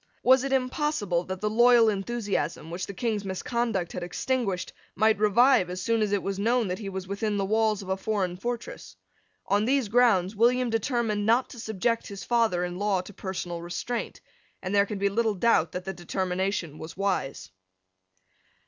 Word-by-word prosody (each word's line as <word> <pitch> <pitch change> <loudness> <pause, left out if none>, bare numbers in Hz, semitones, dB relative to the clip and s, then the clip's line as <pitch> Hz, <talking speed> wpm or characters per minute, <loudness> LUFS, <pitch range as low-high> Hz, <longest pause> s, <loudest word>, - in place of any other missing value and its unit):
Was 260 0 +5
it 275 - -2
impossible 255 - 0
that 190 0 -5
the 210 - 0
loyal 240 0 +6
enthusiasm, 200 -7 -2
which 180 +2 -4
the 200 - -6
King's 215 -1 -1
misconduct 195 -1 -2
had - - -4
extinguished, 195 +1 -2 0.2
might 215 0 +3
revive 215 -1 +4
as 180 +1 -4
soon 230 +4 0
as 210 -1 +1
it 205 -1 0
was 195 0 -3
known 230 0 +1
that 180 - -3
he 205 -3 -5
was 190 -1 -6
within 205 +1 -2
the 195 - 0
walls 215 0 +1
of 190 - -10
a 190 - +1
foreign 190 -2 -2
fortress? 235 +5 -6 0.5
On 205 +1 +2
these 260 -3 +1
grounds 215 -5 +3
William 240 +2 +3
determined 225 -2 0
not 235 +3 +3
to 240 - -10
subject 225 +2 -1
his 200 -2 -7
father 225 -7 +1
in 180 0 -4
law 200 -2 +1
to 205 - -12
personal 180 -3 -5
restraint; 180 +8 -4 0.4
and 185 - -3
there 200 0 +4
can 210 - -4
be 200 +1 +1
little 220 +1 +1
doubt 185 -5 +2
that 180 0 -5
the 190 - -3
determination 180 -2 -2
was 160 +3 -9
wise. 190 - -2
205 Hz, 185 wpm, -27 LUFS, 185-235 Hz, 0.5 s, loyal